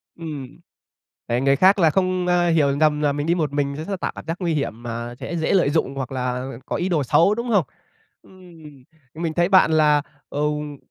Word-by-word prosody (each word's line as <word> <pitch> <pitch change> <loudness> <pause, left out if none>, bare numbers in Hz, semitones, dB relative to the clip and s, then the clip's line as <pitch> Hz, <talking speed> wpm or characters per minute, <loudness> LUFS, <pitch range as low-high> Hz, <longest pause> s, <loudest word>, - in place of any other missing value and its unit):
Ừm. 150 -3 -8 0.7
Để 120 +1 0
người 135 0 +3
khác 190 +5 +5
là 165 -3 +4
không, 185 0 0
a, 175 -1 +2
hiểu 145 -4 +2
nhầm 150 -1 +2
là 145 -1 +2
mình 145 +2 -3
đi 170 - +2
một 155 -5 -1
mình 140 -1 -1
s - - -9
sẽ 195 - -2
tạo - - -2
cảm - - -9
giác 165 - -3
nguy 170 -3 0
hiểm 120 -5 -3
mà 120 0 -5
sẽ 170 +6 -4
dễ 160 - 0
lợi 170 -7 +3
dụng 145 -3 0
hoặc 135 -1 -5
là 125 0 -3 0.2
có - - -2
ý 180 +2 -1
đồ 160 -5 +1
xấu, 170 +10 +3
đúng 235 +2 -4
không? 200 -7 +3 0.6
Ừm, 165 -8 -16 0.3
mình 160 0 -3
thấy 175 +1 +2
bạn 185 -4 +5
là, 150 -2 +4 0.3
ừm 150 0 -2
150 Hz, 220 wpm, -22 LUFS, 140-175 Hz, 0.7 s, khác